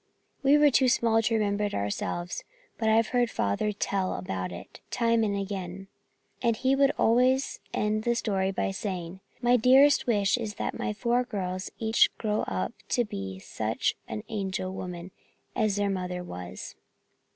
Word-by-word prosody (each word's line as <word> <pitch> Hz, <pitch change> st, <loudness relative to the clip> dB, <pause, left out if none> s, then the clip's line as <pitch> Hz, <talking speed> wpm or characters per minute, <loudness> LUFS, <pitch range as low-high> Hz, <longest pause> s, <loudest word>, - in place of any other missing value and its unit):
We 280 Hz, +1 st, +5 dB
were 295 Hz, -1 st, +5 dB
too 260 Hz, 0 st, +4 dB
small 230 Hz, -1 st, +3 dB
to 225 Hz, +1 st, +1 dB
remember 210 Hz, -1 st, +1 dB
it 205 Hz, -, -3 dB
ourselves, 105 Hz, -, -3 dB, 0.4 s
but 220 Hz, -1 st, +2 dB
I've 225 Hz, 0 st, +3 dB
heard 245 Hz, -2 st, +2 dB
Father 100 Hz, -, 0 dB
tell 195 Hz, -2 st, -1 dB
about 90 Hz, 0 st, -4 dB
it 85 Hz, -, -10 dB
time 230 Hz, -1 st, +2 dB
and 200 Hz, -2 st, 0 dB
again, 195 Hz, -1 st, -5 dB, 0.5 s
and 230 Hz, -2 st, +2 dB
he 260 Hz, +3 st, +2 dB
would 275 Hz, 0 st, +4 dB
always 255 Hz, +4 st, +3 dB
end 215 Hz, +1 st, 0 dB
the 235 Hz, +1 st, +1 dB
story 195 Hz, -5 st, 0 dB
by 195 Hz, 0 st, -1 dB
saying, 185 Hz, -2 st, -5 dB, 0.2 s
'My 245 Hz, +1 st, +5 dB
dearest 270 Hz, +5 st, +5 dB
wish 205 Hz, -1 st, +2 dB
is 215 Hz, -3 st, -4 dB
that -, -, -3 dB
my -, -, -2 dB
four 240 Hz, +3 st, +1 dB
girls 185 Hz, -5 st, -4 dB
each 220 Hz, 0 st, +4 dB
grow 215 Hz, -1 st, 0 dB
up 95 Hz, 0 st, -2 dB, 0.2 s
to 245 Hz, -, +2 dB
be 95 Hz, -, -5 dB
just 95 Hz, -, -15 dB
such 110 Hz, 0 st, -1 dB
an 110 Hz, -1 st, -5 dB
angel 190 Hz, -3 st, -3 dB
woman 180 Hz, -1 st, -6 dB, 0.4 s
as 215 Hz, -3 st, +1 dB
their 205 Hz, -1 st, +1 dB
mother 180 Hz, -1 st, -3 dB
was.'" 90 Hz, -, -8 dB
205 Hz, 170 wpm, -28 LUFS, 185-235 Hz, 0.5 s, We